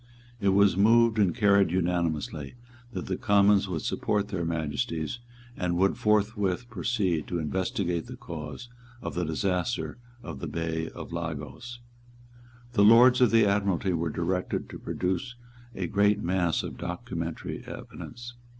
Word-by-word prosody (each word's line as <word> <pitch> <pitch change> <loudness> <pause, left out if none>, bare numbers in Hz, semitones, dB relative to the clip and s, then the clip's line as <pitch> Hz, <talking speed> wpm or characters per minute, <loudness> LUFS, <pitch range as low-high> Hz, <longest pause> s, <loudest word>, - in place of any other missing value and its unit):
It 100 -2 +2
was 100 -1 +4
moved 115 +2 +4
and 100 -2 +3
carried 100 -4 +4
unanimously, 85 - -1 0.4
that - - -5
the - - -2
Commons 100 -1 +4
would 85 -4 -3
support 105 -1 -1
their 90 -4 -2
Majesties, 80 +4 -2 0.4
and 90 -2 -1
would 95 +2 +3
forthwith 105 0 +1
proceed 95 -6 -1
to 90 - -2
investigate 85 +1 -1
the - - -8
cause 80 +7 -7 0.4
of - - -4
the 90 - -1
disaster 90 +9 -1 0.2
in 65 - -7
the - - -4
Bay 80 -1 -3
of - - -8
Lagos. 120 0 -6 0.9
The 100 -4 +4
Lords 120 +4 +7
of 125 - +6
the 115 -1 +5
Admiralty 100 -2 +1
were 85 0 -1
directed 90 +3 -2
to - - -8
produce 95 +8 -2 0.4
a 95 - -2
great 100 +3 +2
mass 90 -3 0
of - - -7
documentary - - -5
evidence. 120 0 -9
95 Hz, 140 wpm, -28 LUFS, 85-105 Hz, 0.9 s, Lords